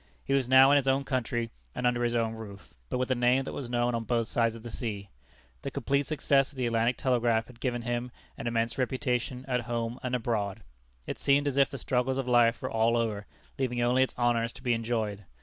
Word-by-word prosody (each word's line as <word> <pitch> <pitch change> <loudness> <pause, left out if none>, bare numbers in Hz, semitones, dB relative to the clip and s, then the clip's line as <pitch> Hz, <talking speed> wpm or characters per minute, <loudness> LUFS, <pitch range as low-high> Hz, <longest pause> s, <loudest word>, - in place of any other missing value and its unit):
He 135 - 0
was 135 -3 +1
now 130 +1 +8
in 145 - +6
his 135 -1 0
own 135 +1 +2
country 120 -3 -2 0.2
and 125 - -2
under 120 0 +2
his 120 0 0
own 115 -1 +1
roof, 105 -3 -10 0.2
but - - -1
with 130 +1 -1
a - - +6
name 125 +2 +3
that - - -6
was 130 -4 -5
known 120 0 +1
on 115 -1 -1
both 115 -1 0
sides 115 -1 +1
of 115 - -11
the 120 - -7
sea. 105 -6 -5 0.5
The - - -4
complete 140 0 0
success 140 -3 +2
of - - -20
the 125 - 0
Atlantic 115 +1 +1
Telegraph 120 -3 +1
had 120 0 -16
given 120 -2 -2
him 120 +1 -2 0.3
an - - -5
immense 115 +1 -1
reputation 125 0 -1
at 125 -2 0
home 115 +1 -3
and 125 0 -1
abroad. 105 -5 -2 0.4
It - - -5
seemed 140 +1 +3
as 140 - -1
if 140 -1 +5
the 140 - -6
struggles 130 +1 0
of 135 -2 -2
life 120 -1 +4
were - - -3
all 115 +1 +2
over, 110 -3 -2 0.3
leaving 125 -2 -1
only 125 +2 +3
its 130 - +1
honors 120 -1 +1
to - - -14
be 125 -2 +2
enjoyed. 110 -3 -2
120 Hz, 235 wpm, -29 LUFS, 115-130 Hz, 0.5 s, now